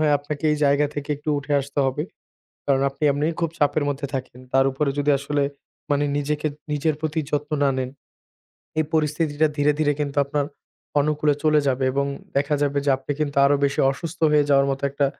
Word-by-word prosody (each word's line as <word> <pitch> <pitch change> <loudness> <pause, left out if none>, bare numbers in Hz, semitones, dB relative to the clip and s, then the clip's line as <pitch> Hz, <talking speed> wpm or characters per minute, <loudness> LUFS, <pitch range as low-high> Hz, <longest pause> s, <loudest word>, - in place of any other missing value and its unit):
হয় 150 -1 +3
আপনাকে 145 +1 -6
এই 150 - +1
জায়গা 145 +1 +3
থেকে 145 0 -5
একটু 150 +2 -9
উঠে 145 +1 -5
আসতে 140 +1 -6
হবে। 135 +3 -1 0.6
কারণ 135 -1 +2
আপনি 135 +2 -8
এমনি 145 +2 -1 0.2
খুব 165 - +1
চাপের 145 +1 +2
মধ্যে 140 0 -3
থাকেন। 130 -2 -5
তার 135 0 +5
উপরে 140 +2 0
যদি 145 +1 +2
আসলে 140 +1 -1 0.5
মানে 145 0 +2
নিজেকে 150 +1 -1 0.2
নিজের 150 +1 +1
প্রতি 160 0 -1
যত্ন 150 +1 -2
না 140 - +4
নেন। 130 -1 -2 0.9
এই 155 - +3
পরিস্থিতিটা 155 0 +1
ধীরে, 145 +1 +3
ধীরে, 145 -1 +2
কিন্তু 140 -1 -2
আপনার 145 0 -1 0.5
অনুকূলে 150 0 +2
চলে 155 -1 +4
যাবে 130 -1 +1
এবং 140 +1 0 0.3
দেখা 140 +1 +2
যাবে 145 0 +1
যে 140 - +2
আপনি 135 +2 -4
কিন্তু 145 -1 -1
আরো 140 +1 +5
বেশি 140 0 +1
অসুস্থ 165 +4 -6
হয়ে 150 -1 +5
যাওয়ার 140 0 +5
মত 135 0 -2
একটা 140 0 +1
145 Hz, 195 wpm, -23 LUFS, 140-150 Hz, 0.9 s, তার